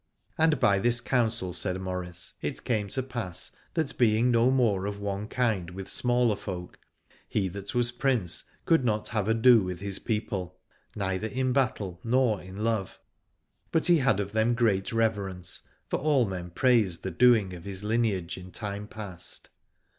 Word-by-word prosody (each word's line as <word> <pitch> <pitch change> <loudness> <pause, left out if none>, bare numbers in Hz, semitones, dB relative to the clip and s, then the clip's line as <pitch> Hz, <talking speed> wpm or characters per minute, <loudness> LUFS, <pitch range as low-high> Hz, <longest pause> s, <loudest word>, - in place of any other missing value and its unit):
And 160 -3 +3
by 100 -1 +4
this 120 +3 +5
counsel, 115 -7 +1
said 90 +1 -1
Maurice, 90 -2 -5
it - - -3
came 105 -4 0
to 130 +6 0
pass 120 -9 -4 0.2
that 160 -4 -1
being 115 +1 +4
no 120 +1 +4
more 110 -7 +2
of 100 0 -4
one 100 +1 -3
kind 110 -9 0
with 95 +2 -7
smaller 120 -3 +3
folk, 90 -3 -7 0.5
he 100 -3 0
that 100 +5 -7
was 120 0 +2
Prince 120 -7 0 0.2
could 165 -5 +4
not 110 -3 0
have 105 -3 -1
ado 115 +1 +6
with 90 -2 -4
his 100 0 -2
people, 105 -5 -3 0.4
neither 95 +1 -1
in 130 +2 -1
battle 105 -9 0
nor 120 -4 +2
in 95 +3 -7
love: 110 -4 -1 0.7
but 160 - +1
he 175 -1 +6
had 125 -7 +2
of 100 -1 -2
them 110 +2 +2
great 105 -5 +1
reverence, 100 -6 -1 0.3
for - - -1
all 140 -4 +3
men 90 -3 -5
praised 105 -4 +2
the 95 - -3
doing 110 -1 +4
of 85 -2 -9
his 100 0 -6
lineage 105 -6 0
in 90 0 -10
time 105 0 -5
past. 95 -5 -6
105 Hz, 170 wpm, -28 LUFS, 95-120 Hz, 0.7 s, ado